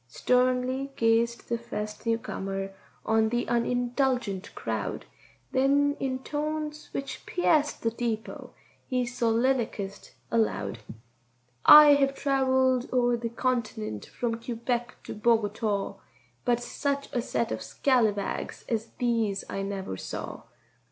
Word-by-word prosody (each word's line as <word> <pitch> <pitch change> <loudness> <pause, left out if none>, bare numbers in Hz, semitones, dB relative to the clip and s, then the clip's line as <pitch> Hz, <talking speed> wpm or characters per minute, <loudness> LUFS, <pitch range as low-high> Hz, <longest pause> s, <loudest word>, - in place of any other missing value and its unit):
Sternly 255 - +1
gazed 230 +1 +2
the 235 0 -1
first 215 -1 -6
newcomer 195 -4 -2 0.3
on 220 0 +3
the 240 +1 0
unindulgent 245 -4 0
crowd, - - -3 0.5
Then 285 +2 +3
in 260 -1 -2
tones 305 0 -3
which 275 - -5
pierced 310 -5 +1
the 230 - +1
deepô 230 -1 -4 0.4
he 255 -2 +1
solilicussed 235 -4 -1 0.2
aloud:— 115 - 0 0.9
"I 300 -1 +11
hev 275 -1 +2
trevelled 260 -2 +2
o'er 245 -1 +3
this 235 -1 -4
cont'nent 215 - -2
from 230 -1 -3
Quebec 240 +1 -2
to - - -6
Bogotáw, 210 -2 0 0.5
But 240 -1 +3
setch 280 +3 -3
a 245 - +1
set 235 -1 -1
of - - -2
scallawags 220 -7 0
as 225 -1 -1
these 225 -5 0
I 195 - -3
never 195 - -4
saw. - - -6
240 Hz, 115 wpm, -28 LUFS, 220-260 Hz, 0.9 s, I